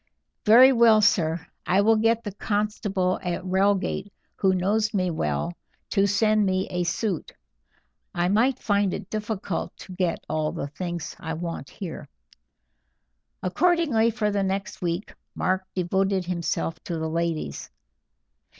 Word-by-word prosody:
"Very 250 Hz, +5 st, +8 dB
well, 230 Hz, -3 st, +6 dB
sir, 170 Hz, -6 st, +2 dB, 0.2 s
I 190 Hz, +2 st, +4 dB
will 225 Hz, +2 st, +4 dB
get 225 Hz, +1 st, +2 dB
the 205 Hz, -, -4 dB
constable 205 Hz, -3 st, -1 dB
at 180 Hz, 0 st, -3 dB
Reigate, 195 Hz, +1 st, +1 dB, 0.3 s
who 190 Hz, -1 st, +3 dB
knows 210 Hz, +4 st, +1 dB
me 185 Hz, -2 st, +1 dB
well, 75 Hz, -, -1 dB, 0.4 s
to 200 Hz, -1 st, +3 dB
send 215 Hz, +1 st, +3 dB
me 190 Hz, -1 st, 0 dB
a 180 Hz, 0 st, 0 dB
suit. 185 Hz, 0 st, -2 dB, 0.8 s
I 175 Hz, 0 st, 0 dB
might 235 Hz, +7 st, +3 dB
find 200 Hz, -4 st, +1 dB
it -, -, -8 dB
difficult 210 Hz, -4 st, -3 dB
to 185 Hz, -, -10 dB
get 180 Hz, -2 st, -1 dB
all 155 Hz, -1 st, -1 dB
the 140 Hz, -, -4 dB
things 170 Hz, +1 st, -5 dB
I 160 Hz, 0 st, -4 dB
want 165 Hz, -4 st, -5 dB
here." 165 Hz, -6 st, -7 dB, 1.4 s
Accordingly, 290 Hz, -, +2 dB
for 215 Hz, -2 st, -1 dB
the 200 Hz, -1 st, 0 dB
next 195 Hz, +1 st, -3 dB
week 175 Hz, +2 st, -2 dB, 0.2 s
Mark 185 Hz, 0 st, 0 dB
devoted 190 Hz, +1 st, 0 dB
himself 170 Hz, -2 st, -2 dB
to 170 Hz, -, -3 dB
the 160 Hz, 0 st, -2 dB
ladies. 165 Hz, -, -2 dB
190 Hz, 140 wpm, -25 LUFS, 175-215 Hz, 1.4 s, Very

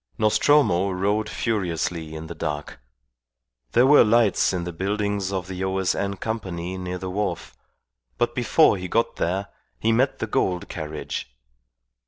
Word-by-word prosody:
Nostromo 110 Hz, -3 st, +3 dB
rode 100 Hz, +3 st, 0 dB
furiously 85 Hz, -6 st, -2 dB
in 80 Hz, +1 st, -6 dB
the 85 Hz, -, -7 dB
dark. 75 Hz, -5 st, -5 dB, 0.9 s
There 120 Hz, -, +5 dB
were 145 Hz, +2 st, +7 dB
lights 115 Hz, -1 st, +3 dB
in 90 Hz, -2 st, -2 dB
the 85 Hz, 0 st, -5 dB
buildings 100 Hz, +1 st, -1 dB
of 95 Hz, -2 st, -3 dB
the 95 Hz, 0 st, -4 dB
O.S.N. 95 Hz, +1 st, 0 dB
Company 95 Hz, -5 st, -4 dB
near 90 Hz, 0 st, -4 dB
the 95 Hz, 0 st, -5 dB
wharf, 105 Hz, +1 st, -3 dB, 0.6 s
but 120 Hz, -, +1 dB
before 125 Hz, 0 st, +4 dB
he 95 Hz, 0 st, -5 dB
got 115 Hz, +5 st, 0 dB
there 95 Hz, +4 st, -1 dB, 0.3 s
he 115 Hz, -, +2 dB
met 130 Hz, +4 st, +2 dB
the -, -, -2 dB
Gould 90 Hz, -4 st, -1 dB
carriage. 75 Hz, -6 st, -5 dB
95 Hz, 145 wpm, -24 LUFS, 90-110 Hz, 0.9 s, were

